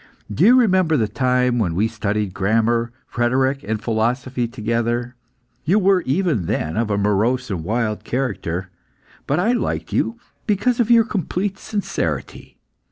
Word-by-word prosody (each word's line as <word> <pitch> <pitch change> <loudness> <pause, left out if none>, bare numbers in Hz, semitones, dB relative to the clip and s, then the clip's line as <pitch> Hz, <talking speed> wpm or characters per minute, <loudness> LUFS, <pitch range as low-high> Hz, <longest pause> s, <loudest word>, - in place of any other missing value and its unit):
Do 145 - +1
you 235 +6 +7
remember 185 -10 +3
the 110 - +1
time 125 +2 +1
when 85 -7 0
we 105 +5 +2
studied 105 -3 -2
grammar, 115 +4 +1 0.2
rhetoric, 130 +3 +1
and 110 +1 -2
philosophy 120 +3 -1
together? 120 +1 -2 0.5
You 175 +8 +3
were, 195 -2 +3
even 145 - 0
then, 80 -6 -2
of 115 0 0
a 100 - 0
morose 105 +5 +1
and 85 -5 -3
wild 110 +2 -1
character, 95 -8 -3 0.6
but 145 +4 +1
I 215 +6 +2
liked 245 - -2
you 230 +1 0 0.3
because 215 +4 +1
of 235 -1 +2
your 230 -2 +6
complete 195 0 -2
sincerity. 205 -2 -4
120 Hz, 150 wpm, -21 LUFS, 110-180 Hz, 0.6 s, you